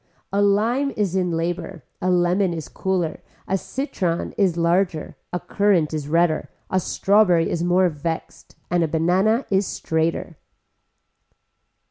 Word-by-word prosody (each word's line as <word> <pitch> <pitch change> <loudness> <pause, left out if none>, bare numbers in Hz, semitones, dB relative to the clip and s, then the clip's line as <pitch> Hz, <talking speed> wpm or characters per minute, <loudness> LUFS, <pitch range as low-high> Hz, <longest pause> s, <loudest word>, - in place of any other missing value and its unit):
A 200 - +2
lime 225 +7 +2
is 200 -4 0
in 180 -1 +1
labor, 170 +1 -3 0.2
a 185 - +1
lemon 180 0 +2
is 160 -3 -6
cooler, 185 -4 -2 0.3
a 190 - +1
citron 190 - -2
is 190 -6 +1
larger, 170 -1 0 0.2
a 180 - -2
currant 190 -7 +1
is 150 -2 -3
redder, 165 0 +1 0.2
a 190 - +3
strawberry 185 -2 +3
is 170 - -1
more 180 +1 +3
vexed, 160 0 -5 0.2
a 175 -2 +2
banana 185 - +2
is 195 -1 +2
straighter. 160 0 -2
180 Hz, 130 wpm, -22 LUFS, 165-195 Hz, 0.3 s, a